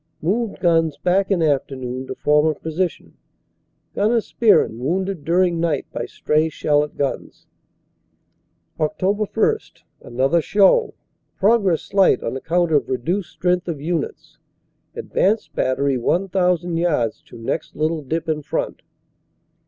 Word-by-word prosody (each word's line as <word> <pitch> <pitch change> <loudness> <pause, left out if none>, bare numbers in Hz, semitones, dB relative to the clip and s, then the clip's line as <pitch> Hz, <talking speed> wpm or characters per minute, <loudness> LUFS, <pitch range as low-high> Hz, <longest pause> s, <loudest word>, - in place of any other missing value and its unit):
Moved 210 +7 -1
guns 165 -3 +2
back 190 +2 +1
in 185 -5 +2
afternoon 130 -3 -2
to - - -5
former 150 +1 +2
position. 165 +4 -4 0.8
Gnr. 220 +2 +2
Spearn 210 - +2
wounded 180 +5 -2
during 175 +2 +2
night 165 -4 0
by - - -4
stray 155 +1 0
shell 145 -1 +1
at 150 - -8
guns. 140 -2 -4 1.3
"Oct. 155 +3 -2 0.3
1 440 - +3 0.5
Another 135 +7 +2
show. 205 - +3 0.4
Progress 200 -5 +2
slight 195 -9 +3
on 115 - -3
account 170 +5 0
of 145 -2 +2
reduced 170 - -2
strength 180 0 -1
of 165 -5 -3
units. 160 +1 -4 0.6
Advanced 210 +4 0
battery 130 0 0
1,000 180 +2 0
yards 150 -10 0
to - - -14
next 115 +7 -4
little 155 +1 -1
dip 160 +4 -3
in 155 -1 -1
front." - - -3
165 Hz, 125 wpm, -21 LUFS, 145-185 Hz, 1.3 s, 1